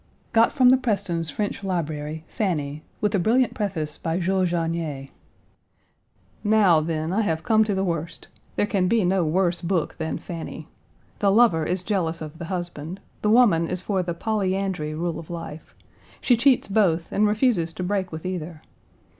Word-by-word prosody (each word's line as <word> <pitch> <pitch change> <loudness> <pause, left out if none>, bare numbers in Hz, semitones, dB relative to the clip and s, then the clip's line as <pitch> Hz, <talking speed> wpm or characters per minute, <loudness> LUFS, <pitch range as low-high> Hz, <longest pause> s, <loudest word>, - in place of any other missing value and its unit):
Got 230 0 +5
from 255 -4 +5
the 260 - +6
Prestons' 200 -9 -1
French 200 +4 -3
library, 155 -4 -3
Fanny, 155 -8 -2 0.2
with 210 - +1
a 200 - +2
brilliant 235 +7 +2
preface 165 -8 -3
by 165 +1 -1
Jules 185 0 +1
Janier. 165 -5 -2 1.3
Now, 205 -6 +5
then, 160 +1 -2
I 220 - +2
have 160 -6 -1
come 220 -1 +4
to 205 -2 -1
the 190 - 0
worst. 170 -2 -3 0.3
There - - +2
can 195 -3 +1
be 220 0 +2
no 185 0 +2
worse 175 +2 +1
book 170 -2 -1
than 160 0 -2
Fanny. 170 -2 -7 0.5
The 200 -1 +3
lover 195 -8 +4
is 180 +1 -1
jealous 170 -5 -1
of 155 0 -8
the 170 - -5
husband. 175 -1 -5 0.2
The 210 - +1
woman 210 -8 +5
is 180 +1 -3
for 190 -1 0
the 175 -1 -3
polyandry 190 -6 -1
rule 165 0 -2
of 165 - -11
life. 165 -2 -8 0.4
She 250 - +3
cheats 250 +2 +3
both 185 -5 +1
and 210 +1 +3
refuses 210 -6 +1
to 180 - -5
break 190 0 -1
with 160 +2 -7
either. 170 -3 -5
180 Hz, 170 wpm, -24 LUFS, 165-205 Hz, 1.3 s, the